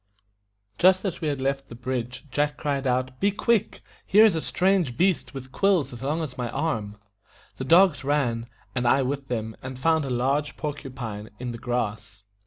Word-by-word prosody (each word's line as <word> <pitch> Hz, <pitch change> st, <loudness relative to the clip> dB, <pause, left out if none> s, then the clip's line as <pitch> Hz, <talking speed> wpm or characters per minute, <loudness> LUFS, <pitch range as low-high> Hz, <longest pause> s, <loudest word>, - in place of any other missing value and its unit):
Just 185 Hz, +2 st, +5 dB
as 180 Hz, -3 st, -3 dB
we 160 Hz, -, -1 dB
had 145 Hz, -2 st, -1 dB
left 135 Hz, +1 st, -2 dB
the 115 Hz, -, -9 dB
bridge, 125 Hz, +2 st, -4 dB
Jack 145 Hz, 0 st, 0 dB
cried 140 Hz, -2 st, -1 dB
out, 130 Hz, 0 st, -1 dB
"Be 200 Hz, -, +3 dB
quick! 215 Hz, +1 st, 0 dB, 0.2 s
here 215 Hz, +3 st, +6 dB
is 215 Hz, -, +4 dB
a 160 Hz, -, -1 dB
strange 180 Hz, -10 st, +1 dB
beast 180 Hz, -5 st, +1 dB
with 130 Hz, -1 st, -8 dB
quills 190 Hz, -5 st, +2 dB
as 120 Hz, -, -9 dB
long 150 Hz, +5 st, -1 dB
as 130 Hz, -5 st, -7 dB
my 120 Hz, -1 st, -2 dB
arm." 110 Hz, -9 st, -2 dB, 0.6 s
The 130 Hz, -, -4 dB
dogs 170 Hz, 0 st, +5 dB
ran, 125 Hz, -5 st, 0 dB, 0.3 s
and 125 Hz, -1 st, 0 dB
I 135 Hz, +3 st, +4 dB
with 135 Hz, +1 st, -3 dB
them, 110 Hz, -3 st, -3 dB
and 130 Hz, 0 st, -7 dB
found 160 Hz, +3 st, +2 dB
a -, -, -4 dB
large 135 Hz, +4 st, 0 dB
POR 150 Hz, -2 st, -2 dB
CU 140 Hz, -1 st, -9 dB
PINE, 110 Hz, -5 st, -6 dB
in 125 Hz, +1 st, -4 dB
the 115 Hz, -, -7 dB
grass. 110 Hz, -4 st, -3 dB
135 Hz, 195 wpm, -25 LUFS, 125-160 Hz, 0.6 s, here